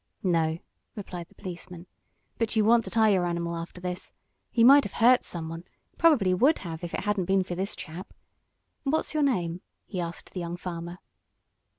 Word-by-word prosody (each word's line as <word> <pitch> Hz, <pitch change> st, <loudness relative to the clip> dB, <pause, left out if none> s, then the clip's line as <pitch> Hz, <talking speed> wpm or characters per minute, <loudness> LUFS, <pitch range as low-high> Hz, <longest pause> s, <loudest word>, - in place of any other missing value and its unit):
"No," 165 Hz, -3 st, +1 dB, 0.4 s
replied 180 Hz, -5 st, -7 dB
the -, -, -25 dB
policeman, 180 Hz, -2 st, -8 dB, 0.5 s
"but 230 Hz, -1 st, 0 dB
you 215 Hz, -1 st, +3 dB
want 230 Hz, +1 st, +5 dB
to -, -, -5 dB
tie 220 Hz, -1 st, +4 dB
your 185 Hz, -3 st, +2 dB
animal 170 Hz, 0 st, -2 dB
after 170 Hz, +2 st, -7 dB
this. 180 Hz, 0 st, -5 dB, 0.4 s
He 230 Hz, -, +2 dB
might 280 Hz, +4 st, +8 dB
have -, -, -6 dB
hurt 245 Hz, +2 st, +5 dB
someone 165 Hz, 0 st, -4 dB, 0.3 s
probably 280 Hz, -, +4 dB
would 270 Hz, -, +4 dB
have 165 Hz, 0 st, -6 dB
if 170 Hz, -, -4 dB
it -, -, -2 dB
hadn't 205 Hz, -3 st, 0 dB
been 190 Hz, +1 st, +2 dB
for 180 Hz, -, -5 dB
this 190 Hz, +3 st, -2 dB
chap. 170 Hz, +4 st, -8 dB, 0.7 s
What's 300 Hz, +3 st, -1 dB
your 305 Hz, -, +1 dB
name?" 180 Hz, -, 0 dB, 0.2 s
he 185 Hz, -, -4 dB
asked 170 Hz, 0 st, -6 dB
the 185 Hz, -, -4 dB
young 170 Hz, 0 st, -4 dB
farmer. 170 Hz, 0 st, -6 dB
180 Hz, 185 wpm, -27 LUFS, 170-220 Hz, 0.7 s, might